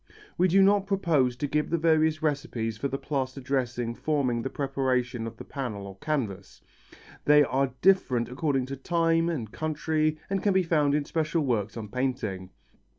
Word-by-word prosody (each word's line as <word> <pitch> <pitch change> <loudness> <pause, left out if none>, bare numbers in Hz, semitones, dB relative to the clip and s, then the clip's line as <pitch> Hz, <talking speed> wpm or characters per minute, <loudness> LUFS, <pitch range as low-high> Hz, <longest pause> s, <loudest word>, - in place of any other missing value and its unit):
We 180 - +3
do 195 +2 +5
not 200 0 +3
propose 160 -11 +2
to 135 - -3
give 150 +1 0
the 170 - +1
various 160 -1 +2
recipes 125 -7 -1
for 115 +6 -2
the 135 - -3
plaster 135 -2 -3
dressing 125 -3 -2
forming 130 -4 0
the 135 - -3
preparation 130 -4 -1
of 115 0 -9
the - - -8
panel 120 -8 -5
or 95 0 -10
canvas. 115 -11 -3 0.7
They 150 0 +7
are 135 -1 0
different 150 -11 +3
according 135 0 -1
to 135 +1 -5
time 165 +3 +1
and 120 -11 -4
country 155 0 -1
and 195 -1 -1
can 205 - +2
be 190 - +4
found 150 -4 +2
in 150 -1 0
special 160 +1 0
works 110 -4 -1
on 110 -2 -5
painting. 110 -7 -2
140 Hz, 175 wpm, -27 LUFS, 125-160 Hz, 0.7 s, They